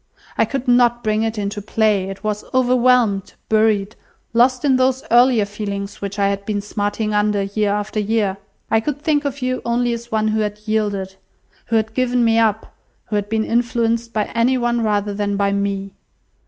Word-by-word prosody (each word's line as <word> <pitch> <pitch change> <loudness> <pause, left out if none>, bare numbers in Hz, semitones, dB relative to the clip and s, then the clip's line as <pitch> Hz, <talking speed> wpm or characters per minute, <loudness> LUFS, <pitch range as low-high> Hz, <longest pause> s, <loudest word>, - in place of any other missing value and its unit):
I - - +3
could 270 -2 -4
not 240 -1 +3
bring 215 -1 +1
it 225 0 -2
into 205 0 -3
play; 210 -2 +1
it 195 - -8
was 210 -1 -2
overwhelmed, 250 -5 +3 0.2
buried, 215 -1 +2 0.4
lost 250 +3 +3
in 265 -2 +4
those 260 +1 +1
earlier 240 -2 +5
feelings 200 -1 -5
which 200 +1 -5
I 200 -1 +2
had 200 0 -3
been 205 0 -2
smarting 205 +1 -2
under 210 -1 +1
year 205 +1 -1
after 210 +1 -2
year. 210 -2 0 0.3
I 225 - +4
could 290 +5 -3
think 295 -1 0
of 280 -1 -3
you 255 0 -1
only 240 0 0
as 235 0 -7
one 215 0 +1
who 215 0 0
had 210 -1 -2
yielded, 205 -3 -2 0.5
who 230 - 0
had 220 0 0
given 250 -1 +1
me 225 0 +3
up, 220 -1 0 0.4
who 210 - -1
had 205 0 -1
been 220 0 0
influenced 235 -1 0
by 215 -2 0
any 240 +3 +2
one 240 -1 0
rather 205 -1 0
than 200 0 -2
by 200 0 +1
me. 200 -1 -2
220 Hz, 190 wpm, -20 LUFS, 205-240 Hz, 0.5 s, earlier